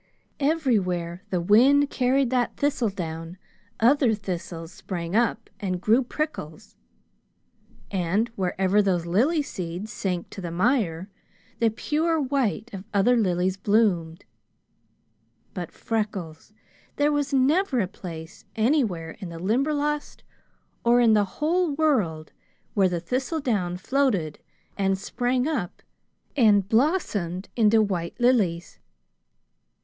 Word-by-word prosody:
Everywhere 200 - 0
the 180 - 0
wind 260 +10 +4
carried 260 0 +1
that 250 -2 0
thistledown, 180 - -2 0.4
other 245 -1 +4
thistles 175 -4 -6
sprang 175 0 -5
up 235 0 +1
and 185 -4 -2
grew 220 +7 +3
prickles; 230 - -5 1.2
and 195 +4 0
wherever 190 -1 +1
those 180 -4 0
lily 265 - +2
seeds 185 -1 -6
sank 180 -4 -3
to 195 - -8
the 175 - -4
mire, 185 -2 0 0.5
the 230 - +4
pure 315 +8 0
white 255 -6 -1
of 190 -1 -6
other 205 +5 +4
lilies 185 -3 +1
bloomed. 190 -5 +1 1.3
But, - - -5
Freckles, 205 -7 -4 0.4
there 290 +1 +2
was 290 -1 0
never 275 +2 +2
a 205 - +2
place 170 +1 -9
anywhere 220 - +1
in 190 -4 -6
the 165 - -8
Limberlost, 290 - -1 0.6
or 240 +1 +4
in 230 -2 +5
the 210 -1 +4
whole 315 - 0
world, 210 - 0 0.4
where 195 -3 +3
the 175 -1 -2
thistledown 230 - -1
floated 200 - 0 0.4
and 195 -1 +1
sprang 245 +6 -1
up 255 - -3 0.5
and 210 -7 +4
blossomed 215 - 0
into 220 -1 +4
white 175 -5 -3
lilies! 210 -9 +1
210 Hz, 115 wpm, -25 LUFS, 180-260 Hz, 1.3 s, in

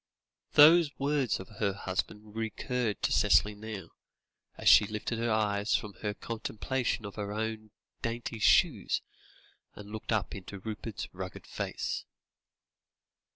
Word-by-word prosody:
Those 160 +2 +8
words 140 -3 +1
of 95 - -8
her 100 -3 +1
husband 105 +2 -4
recurred 115 0 -2
to - - +2
Cicely 105 - +4
now, 105 -4 -7 0.7
as - - -3
she 105 - +8
lifted 110 +2 -3
her 115 0 0
eyes 105 -1 +1
from 105 -3 -2
their 105 -1 -2
contemplation 115 +1 -2
of 100 - -6
her 100 -1 -3
own 110 0 -3 0.3
dainty 115 -1 -3
shoes - - +3 0.7
and 105 0 -10
looked 110 +1 -5
up 110 -3 0
into 100 0 -8
Rupert's 110 +1 -5
rugged 95 0 -7
face. - - -3
110 Hz, 130 wpm, -30 LUFS, 105-115 Hz, 0.7 s, Those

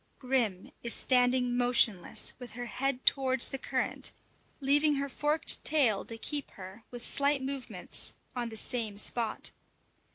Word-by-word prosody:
Grim 240 -8 -2
is 235 - +1
standing 250 -1 +2
motionless 245 -6 +2
with 245 -3 -9
her 245 +1 -6
head 265 +1 -3
towards 260 -2 +3
the 270 - -5
current, - - -1 0.5
leaving 290 +2 +3
her 280 0 -2
forked 295 +3 +2
tail 255 -10 +3
to 230 - -7
keep 290 +4 -4
her, 190 +3 -10
with 240 -1 -9
slight 280 -1 +1
movements, 270 -1 -2 0.2
on 240 -1 -3
the 220 - -4
same 220 -3 -1
spot. 225 +1 0
250 Hz, 140 wpm, -30 LUFS, 230-275 Hz, 0.5 s, towards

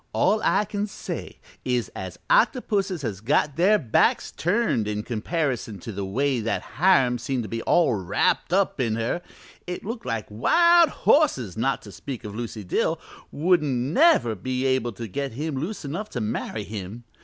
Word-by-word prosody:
All 215 +3 +2
I 205 +2 +3
can 205 0 -3
say 200 - -7 0.3
is 125 -2 -1
as - - -6
octopuses 205 - +2
has 100 -5 -4
got 140 +4 +1
their 195 +5 +4
backs 120 - +2
turned 175 - 0
in 105 0 -2
comparison 125 - -2
to 115 - -6
the 100 -1 -4
way 130 +7 0
that 115 +1 -2 0.2
Hiram 135 -9 +4
seemed 120 +1 -2
to 110 - -7
be 115 +2 -3
all 170 -1 +3
wrapped 95 - 0
up 190 -4 +1
in 115 -3 0
her. 115 +10 -1 0.5
It 180 +1 -5
looked 225 - -5
like 115 -3 -2
wild 340 - +5
horses, 130 - +2
not 130 +5 -1
to 105 - -11
speak 125 +7 -7
of 105 -2 -7
Lucy 115 -1 -5
Dill, 90 - 0 0.3
wouldn't 155 -5 +2 0.2
never 270 - +5
be 130 +6 -3
able 130 -3 +1
to 115 +3 -6
get 135 +6 -4
him 150 +5 -3
loose 165 +6 -4
enough 175 +10 -4
to - - 0
marry 110 0 -3
him. 105 +3 -7
130 Hz, 175 wpm, -25 LUFS, 110-180 Hz, 0.5 s, wild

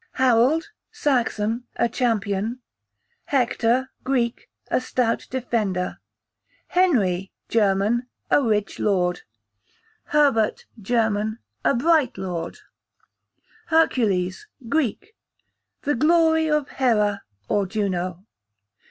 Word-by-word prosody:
Harold, 260 - +3 0.2
Saxon, 245 - 0
a - - +2
champion. 225 -2 -1 0.7
Hector, 250 -1 +1
Greek, 245 -3 -1 0.2
a - - +1
stout 250 -2 -1
defender. 220 -8 -2 0.7
Henry, 200 - +2 0.2
German, 215 +3 +2 0.2
a - - +5
rich 210 -5 0
lord. 180 -4 +1 0.8
Herbert, 275 -8 +2 0.2
German, 220 0 0 0.3
a - - +3
bright 300 -1 +2
lord. 175 -3 -4 1.1
Hercules, 230 - +1 0.2
Greek, 315 - -1 0.7
the 290 - +1
glory 320 +3 +3
of 300 -2 +1
Hera, 210 -6 +1 0.3
or 200 -2 +1
Juno. 185 -2 -2
235 Hz, 85 wpm, -23 LUFS, 205-275 Hz, 1.1 s, a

